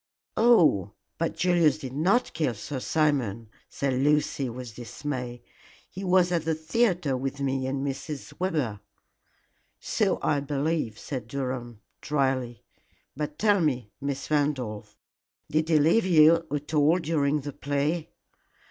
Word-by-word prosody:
"Oh, 160 - +4 0.3
but 165 - -1
Julius 170 -4 +3
did 130 -2 -7
not 190 - +2
kill 150 -7 0
Sir 130 +6 -5
Simon," 125 -8 0 0.2
said 140 -1 -1
Lucy, 140 0 +1
with 120 -1 -8
dismay. 125 +1 -5 0.5
"He 190 - -7
was 180 -1 +3
at 170 -3 +1
the 160 0 0
theatre 165 - +1
with 135 +2 -3
me 135 -1 -1
and 135 +1 -2
Mrs. 140 +1 -5
Webber." 150 - -1 1.0
"So - - 0
I 145 - +2
believe," 140 -4 -1
said 125 -3 -6
Durham, 125 -4 -4 0.2
dryly; 130 -5 -1 0.5
"but 150 +1 -4
tell 205 -2 +3
me, 125 -9 -1
Miss 140 +1 -4
Randolph, 135 -8 -1 0.5
did 155 +1 +1
he 160 - +5
leave 165 +8 +3
you 165 -1 +5
at 145 +2 -4
all 150 +3 +4
during 150 -3 0
the 145 +1 -6
play?" 145 +5 -1
145 Hz, 135 wpm, -27 LUFS, 130-160 Hz, 1.0 s, he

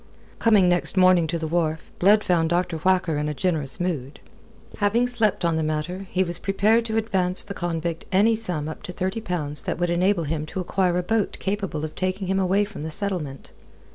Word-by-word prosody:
Coming 210 -5 +5
next 175 +2 +1
morning 185 -3 +5
to 170 +2 -1
the 160 - -4
wharf, 160 -1 -1
Blood 210 +3 +5
found 165 -3 +2
Dr. 175 -1 0
Whacker 180 -2 +1
in 150 0 -1
a 150 - -4
generous 155 -5 0
mood. 155 -7 -3 0.6
Having 215 +4 +2
slept 225 -7 +1
on 165 -1 +1
the - - 0
matter, 155 +5 -3
he 185 - +1
was 175 -2 -3
prepared 215 +4 +2
to 220 -1 -1
advance 190 -5 -1
the 200 - -7
convict 170 -2 -3
any 205 +4 +4
sum 180 -9 -3
up 155 - -7
to - - -7
thirty 190 +5 -3
pounds 150 -8 -3
that - - -3
would 175 0 0
enable 180 +1 +2
him 155 0 -3
to 190 - -5
acquire 180 0 0
a 180 - 0
boat 220 +1 0
capable 195 -6 -2
of 155 - -7
taking 185 +1 -2
him 190 +1 0
away 195 +2 +2
from 200 -6 -9
the 160 - -4
settlement. 160 -6 -4
180 Hz, 205 wpm, -24 LUFS, 160-195 Hz, 0.6 s, Coming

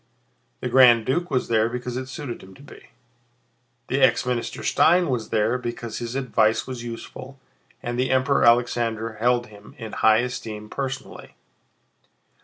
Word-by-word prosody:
The - - -2
Grand 120 -3 +6
Duke 175 +7 -1
was 130 - 0
there 115 -1 +2
because 125 0 -5
it 130 0 -4
suited 130 -3 -7
him 95 0 -14
to 140 - -16
be. 145 - -15 1.0
The 135 +2 -1
ex - - +4
Minister 125 -2 -3
Stein 175 -2 +3
was 120 -3 -2
there 110 +3 +1
because 120 -2 -5
his 120 +1 -5
advice 115 -5 +1
was 130 -2 -6
useful 130 +3 -9 0.4
and 120 +1 -3
the 130 - +1
Emperor 130 +2 +2
Alexander 115 -2 +2
held 120 +1 +2
him 105 +1 -15
in 110 -4 -7
high 110 +1 +4
esteem 110 -4 -6
personally. 135 -1 -6
120 Hz, 155 wpm, -23 LUFS, 115-130 Hz, 1.0 s, Grand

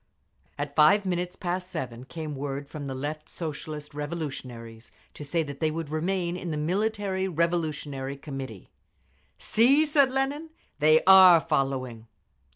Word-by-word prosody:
At 145 0 -4
five 195 +7 +5
minutes 180 -1 -2
past 180 0 -3
seven 130 -8 -5
came 155 0 -6
word 140 0 -4
from 145 -1 -7
the 135 - -4
left 150 +3 -5
Socialist 150 -2 -6
Revolutionaries 130 -7 -6 0.2
to - - -9
say 160 +3 0
that 140 -2 -8
they 160 - +1
would 160 -1 -4
remain 175 +2 -1
in 180 -1 -5
the 155 - -2
Military 190 +3 -1
Revolutionary 155 -5 -2
Committee. 135 - -8 0.7
"See!" 270 +8 +4
said 285 -3 +3
Lenin. 275 +4 -2 0.3
"They 155 +1 +5
are 185 -2 +9
following!" 135 -7 -2
155 Hz, 140 wpm, -27 LUFS, 140-180 Hz, 0.7 s, are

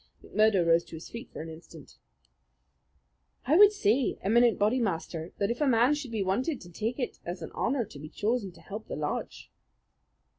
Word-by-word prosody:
McMurdo 215 -5 +3
rose 165 0 +4
to - - -10
his 160 - -9
feet 235 - -8
for - - -6
an 165 - -8
instant. 160 -2 -13 1.5
"I 290 - +3
would 410 +3 +8
say, 250 - +1
Eminent 235 +3 +4
Bodymaster, 195 -7 -1
that 200 +2 0
if 240 - -4
a 295 - +3
man 245 +2 +4
should 290 -3 -4
be 220 -3 -1
wanted 250 - 0
I - - -19
should 175 -1 -14
take 225 +6 -2
it 250 -4 -4
as 175 +2 -6
an - - -7
honour 245 -1 0
to 145 - -12
be 155 +2 -8
chosen 215 0 -1
to - - -17
help 215 +2 -8
the - - -4
lodge." - - -4
215 Hz, 195 wpm, -29 LUFS, 175-245 Hz, 1.5 s, would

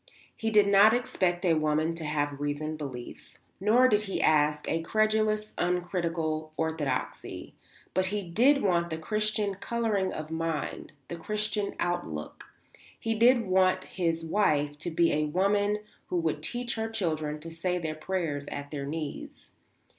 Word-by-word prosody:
He 225 - -1
did 210 -2 +5
not 200 +3 +7
expect 185 -7 0
a 170 - +4
woman 155 +1 +1
to 165 -1 -6
have 145 -2 -1
reasoned 150 +2 -3
beliefs, 130 -5 -8 0.2
nor 225 +6 +5
did 210 -4 +3
he 195 -2 -3
ask 150 -1 +3
a 165 - 0
credulous, 215 +3 +1
uncritical 170 -3 -1
orthodoxy; 160 -3 -3 0.4
but 185 +1 +2
he 205 +1 -2
did 245 +11 +3
want 170 -3 +2
the 160 - -3
Christian 210 +3 -1
colouring 210 -1 -1
of 155 0 -6
mind, 160 -2 -3
the 170 - -6
Christian 210 +3 -2
outlook; 80 - -3 0.5
he 225 - -1
did 235 +1 +4
want 185 0 +3
his 165 -3 -2
wife 150 -6 +1
to 175 - -3
be 170 0 +2
a 155 +1 +1
woman 200 +6 +2 0.3
who 180 - -1
would 160 -3 -1
teach 240 +8 -2
her 225 0 -2
children 155 -8 -2
to 165 +2 -9
say 180 +2 -1
their 160 -3 -3
prayers 155 -3 -3
at 145 +1 -6
her 140 -1 -4
knees. 150 -1 -6
175 Hz, 155 wpm, -29 LUFS, 155-210 Hz, 0.5 s, not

